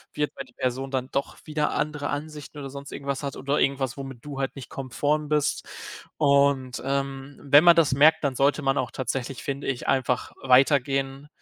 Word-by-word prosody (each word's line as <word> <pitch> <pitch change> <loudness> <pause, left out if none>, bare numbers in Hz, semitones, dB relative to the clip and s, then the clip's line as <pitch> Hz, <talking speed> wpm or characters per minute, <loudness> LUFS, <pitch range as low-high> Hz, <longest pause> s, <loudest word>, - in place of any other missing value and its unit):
wird, 150 0 0
weil 135 - -6
die 125 - -22
Person 130 +1 -2
dann 130 -1 -2
doch 140 - -2
wieder 150 -1 0
andere 150 -1 -2
Ansichten 150 0 -6
oder 135 -2 -6
sonst 140 0 -9
irgendwas 140 -1 -4
hat 140 -1 -4
oder 140 +2 -1
irgendwas, 135 -1 0
womit 135 -3 -8
du 140 -2 -6
halt 135 +1 -2
nicht 135 - -8
konform 145 +3 -1
bist. 150 -1 0 0.5
Und, 140 -3 +2
ähm, 135 0 -3
wenn 145 +2 +6
man 170 -1 +8
das 155 -5 +4
merkt, 155 +3 +5
dann 140 -2 +1
sollte 145 +3 +2
man 135 0 +2
auch 125 - -1
tatsächlich, 130 +1 -4
finde 140 0 -4
ich 130 -3 -3
einfach 130 -1 0
weitergehen, 135 +1 +2
140 Hz, 190 wpm, -25 LUFS, 135-145 Hz, 0.5 s, man